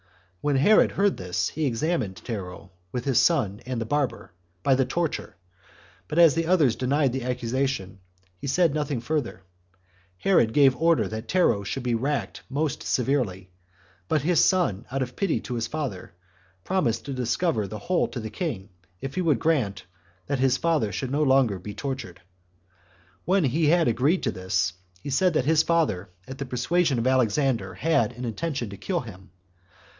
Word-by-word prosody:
When 145 -1 +1
Herod 155 +11 +5
heard 200 0 +2
this, 90 0 -2
he 155 -1 -1
examined 125 - -1
Tero, 95 -3 -7 0.2
with 125 +1 -4
his 135 -4 +3
son 120 - +2
and 130 -2 -2
the 115 - -2
barber, 130 -6 -2 0.3
by 135 - +4
the 130 0 +2
torture; 170 - -3 0.7
but 150 - -4
as 165 -4 +7
the 165 0 -1
others 160 -10 +3
denied 135 0 +1
the 130 - -2
accusation, 125 0 -1
and - - -17 0.4
he - - -6
said 165 +2 +2
nothing 150 -4 -1
further, 120 -6 -3 0.7
Herod 115 - +3
gave 135 -3 +5
order 165 0 +2
that 110 +1 -6
Tero 180 - +2
should 125 +6 -4
be 120 -1 0
racked 120 -3 -2
more 145 +3 0
severely; 115 -11 -1 0.6
but 155 -3 +1
his 170 +2 +3
son, 165 - +1
out 135 0 0
of 125 0 -8
pity 195 -5 0
to 125 - -6
his 115 -1 -2
father, 135 - -5 0.5
promised 185 -12 0
to 140 - -4
discover 125 - 0
the 110 - -6
whole 175 - 0
to 125 - -6
the 110 -2 -6
king, 110 - -4 0.3
if 135 0 -5
he 185 - -1
would 160 -7 +2
grant 110 - 0 0.4
[that 140 -2 -2
his 130 -1 +3
father 155 -11 +1
should 130 +7 -4
be 140 - 0
no - - +2
longer 130 -8 +3
tortured]. 105 -1 -6 1.0
When 190 0 +3
he 150 +4 +1
had 170 +2 +4
agreed 135 +10 +2
to 115 - +1
this, 95 -1 -1 0.3
he 140 - -4
said 180 +5 +2
that 130 - +2
his 160 +1 +4
father, 160 - 0 0.2
at 130 0 -8
the 140 - -3
persuasion 135 +4 +1
of 115 - -1
Alexander, 130 -5 +1
had 125 -8 +1
an 125 +1 -6
intention 125 -1 -3
to 100 - -8
kill 175 - -2
him. 95 -6 -12
130 Hz, 180 wpm, -25 LUFS, 110-155 Hz, 1.0 s, as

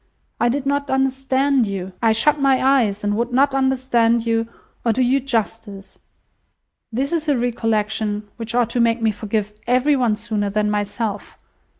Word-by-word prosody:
I 240 - +2
did 270 +2 -2
not 285 0 -1
understand 265 -1 +1
you. 190 -1 -5
I 225 - +4
shut 285 +7 +2
my 270 -1 +3
eyes, 240 -7 +2
and 205 0 0
would 235 +2 -1
not 270 +2 +3
understand 250 -4 +1
you, 225 0 0 0.4
or 230 - +2
do 255 +3 +1
you 260 +3 +2
justice. 225 -5 -4 0.9
This 265 +5 -2
is 320 -2 -1
a 285 - +3
recollection 215 -3 -1
which 230 0 -4
ought 240 -2 +2
to 245 - -1
make 230 0 +2
me 225 -1 +1
forgive 210 0 -3
every 255 +4 +3
one 240 -5 +1
sooner 210 -2 -2
than 210 +1 0
myself. 205 0 -3
235 Hz, 170 wpm, -20 LUFS, 215-265 Hz, 0.9 s, I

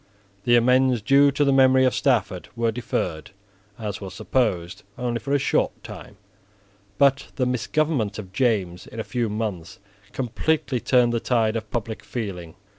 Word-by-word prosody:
The 120 - +5
amends 125 +1 +4
due 140 +6 +5
to 140 +1 +1
the 140 - +3
memory 130 -1 +5
of 130 - +2
Stafford - - 0
were 115 -1 +1
deferred, 100 -8 -3 0.5
as 105 -3 -5
was 95 -2 -7
supposed, 95 -9 -1 0.2
only 120 -2 -2
for 140 - -6
a 145 - +4
short 140 - 0
time. - - -10 0.8
But 135 -1 +3
the 130 - 0
misgovernment 125 -2 0
of 95 -3 -9
James 100 -8 0
in 115 - -9
a - - -2
few 120 -2 -2
months 105 -6 -4 0.3
completely 135 +2 -1
turned 120 -1 +3
the 115 - +1
tide 115 -2 +1
of 110 -1 -4
public 115 -1 -4
feeling. 90 -9 -6
120 Hz, 160 wpm, -23 LUFS, 105-130 Hz, 0.8 s, The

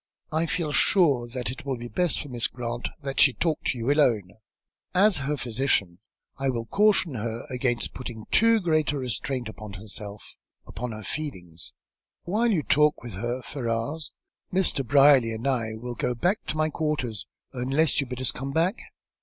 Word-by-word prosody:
"I 160 +2 +1
feel 160 -2 -1
sure 145 -8 +4
that 125 -2 -3
it 135 +5 -9
will 135 -2 -2
be 120 +1 -7
best 180 +6 0
for - - -7
Miss 120 -2 +1
Grant 120 0 -4
that 135 -1 -3
she 140 - +6
talk 160 +2 0
with - - +1
you 120 +3 0
alone. 115 -11 +2 0.6
As 195 -1 +5
her 150 - 0
physician, 115 -8 0 0.4
I 135 0 +1
will 115 -3 -2
caution 200 - +3
her 115 0 -4
against 125 -1 -1
putting 120 -4 -7
too 230 +1 +5
great 155 -4 +2
a - - -2
restraint 130 0 -2
upon 105 -1 -9
herself, 105 +1 -9 0.3
upon 125 -1 -5
her 110 0 -7
feelings. 90 - -5 0.5
While 215 +7 +1
you 165 -8 +1
talk 150 -2 +3
with 120 -4 -7
her, 120 +6 -3
Ferrars, 130 +4 -3 0.4
Mr. 180 -7 +3
Brierly 135 -3 +5
and 110 +3 -6
I 115 -5 0
will 120 +2 -6
go 125 +1 -1
back 180 - 0
to 155 - -2
my 155 0 +1
quarters, 145 -9 -2 0.3
unless 135 +5 +2
you 140 - -4
bid 125 0 -5
us 130 - +1
come 135 +2 -5
back." 170 - +1
130 Hz, 180 wpm, -26 LUFS, 115-155 Hz, 0.6 s, she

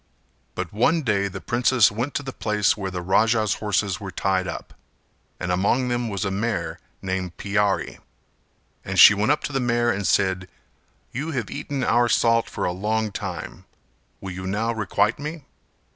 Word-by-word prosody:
But 90 -1 -4
one 150 +10 +2
day 100 -5 +1
the 95 0 -7
princess 120 +1 +3
went 120 +7 -3
to 145 - -1
the 135 -1 -6
place 105 -3 +1
where 100 -2 -4
the 90 -1 -5
Raja's 110 +2 +2
horses 100 -2 0
were 100 -2 -6
tied 95 -1 0
up - - -7 0.7
and 90 - -2
among 110 +8 +1
them 120 -1 -1
was 100 -3 -2
a 95 - -1
mare 110 +4 -2 0.2
named 95 -2 -3
Piyari 100 0 0 0.8
and - - -2
she - - +11
went 105 +6 +1
up 150 - 0
to 145 - -4
the 135 - +1
mare 120 -1 +1
and 100 -2 -2
said 95 -1 +1 0.6
"You 145 +6 -4
have 120 -6 -3
eaten 140 -2 -3
our 120 0 +3
salt 115 0 +3
for - - -3
a - - 0
long 105 +4 -1
time, 95 -2 -6 0.5
will 95 - -6
you 95 +1 -6
now 110 +4 -1
requite 105 +1 0
me?" 150 +1 -6
105 Hz, 175 wpm, -23 LUFS, 95-120 Hz, 0.8 s, she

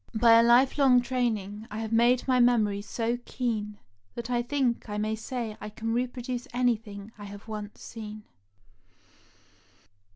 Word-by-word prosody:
By 230 0 +7
a - - +7
lifelong 255 +2 +5
training 220 -4 -2
I 210 - -6
have 220 0 -4
made 240 +3 +3
my 255 -1 +3
memory 220 -5 +3
so 230 +3 -2
keen 215 -5 -3 0.4
that 235 +1 -5
I 240 -1 +2
think 245 -3 -1
I 210 - -3
may 215 +1 -1
say 225 -1 -5
I 210 - -5
can 225 +2 -4
repro 245 +1 -2
duce 250 +1 -4
anything 225 -4 -1
I 205 - -8
have 200 +1 -10
once 210 -1 -7
seen." 215 -2 -8
230 Hz, 155 wpm, -28 LUFS, 210-245 Hz, 0.4 s, By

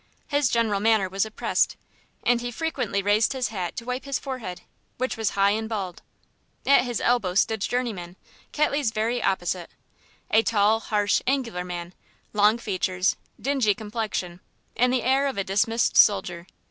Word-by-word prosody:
His 285 -3 +2
general 225 -4 +1
manner 215 -2 +3
was 195 +3 -1
oppressed, 220 - 0 0.5
and 240 -1 +2
he 245 - -3
frequently 245 -7 -2
raised 210 +5 +3
his 255 -4 -1
hat 185 -5 -4
to 235 - -6
wipe 250 +2 -3
his 275 -1 -1
forehead, 245 -10 -6 0.4
which 255 +1 -1
was 225 -3 0
high 200 0 +4
and 220 +1 -2
bald. 195 -5 -4 0.6
At 275 -2 +5
his 240 -2 -2
elbow 235 -7 +1
stood 220 +2 +2
Journeyman, 210 -8 -2 0.4
Ketley's 290 -4 +1
very 225 +2 -1
opposite. 175 -2 -1 0.6
A 220 - +6
tall, 220 0 +3
harsh, 205 -2 +1
angular 240 -9 0
man, 175 0 -6 0.4
long 210 +2 +4
features, 185 -4 0 0.2
a - - -21
dingy 260 -7 +2
complexion, 210 -5 -4 0.4
and 250 +1 +3
the 255 -2 +1
air 270 +2 +3
of 270 - -3
a 195 - 0
dismissed 215 +4 +1
soldier. 175 -4 +4
220 Hz, 160 wpm, -25 LUFS, 195-245 Hz, 0.6 s, A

